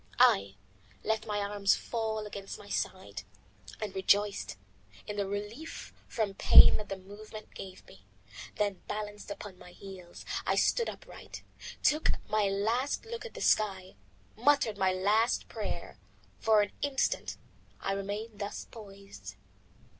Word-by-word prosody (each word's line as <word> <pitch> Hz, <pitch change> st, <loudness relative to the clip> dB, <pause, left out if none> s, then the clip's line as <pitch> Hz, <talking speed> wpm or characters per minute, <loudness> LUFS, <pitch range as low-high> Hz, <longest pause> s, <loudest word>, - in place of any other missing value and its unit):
I 100 Hz, 0 st, +5 dB, 0.5 s
let 220 Hz, 0 st, 0 dB
my 210 Hz, -1 st, -1 dB
arms 200 Hz, -1 st, +2 dB
fall 220 Hz, -2 st, -2 dB
against 200 Hz, -1 st, -6 dB
my 205 Hz, -, -13 dB
sides, 105 Hz, -, -3 dB, 0.6 s
and 210 Hz, -3 st, -3 dB
rejoiced 200 Hz, -, +2 dB, 0.5 s
in 210 Hz, -, -4 dB
the 200 Hz, -1 st, -1 dB
relief 210 Hz, +10 st, -5 dB
from 215 Hz, -4 st, -1 dB
pain -, -, +9 dB
that 210 Hz, -, -7 dB
the 195 Hz, -, -3 dB
movement 210 Hz, +3 st, -11 dB
gave 185 Hz, -1 st, -9 dB
me. 95 Hz, -, -16 dB, 0.5 s
Then 205 Hz, -3 st, 0 dB
balanced 210 Hz, 0 st, -5 dB
upon 200 Hz, -2 st, -7 dB
my 180 Hz, -, -13 dB
heels, 185 Hz, -3 st, -10 dB, 0.2 s
I -, -, +1 dB
stood 470 Hz, -, +3 dB
upright, -, -, -10 dB, 0.4 s
took 305 Hz, +1 st, +4 dB
my 210 Hz, -2 st, +2 dB
last 225 Hz, -, 0 dB
look 460 Hz, 0 st, -5 dB
at -, -, -16 dB
the -, -, -6 dB
sky, 190 Hz, -3 st, +2 dB, 0.4 s
muttered 235 Hz, -4 st, +3 dB
my 190 Hz, 0 st, +4 dB
last 210 Hz, +5 st, +2 dB
prayer. -, -, -5 dB, 0.4 s
For 215 Hz, -2 st, +5 dB
an 205 Hz, -, -4 dB
instant 280 Hz, -2 st, 0 dB, 0.4 s
I 195 Hz, -, -1 dB
remained 205 Hz, +2 st, -4 dB
thus 205 Hz, 0 st, -4 dB
poised. 195 Hz, -, -10 dB
205 Hz, 140 wpm, -31 LUFS, 195-220 Hz, 0.6 s, pain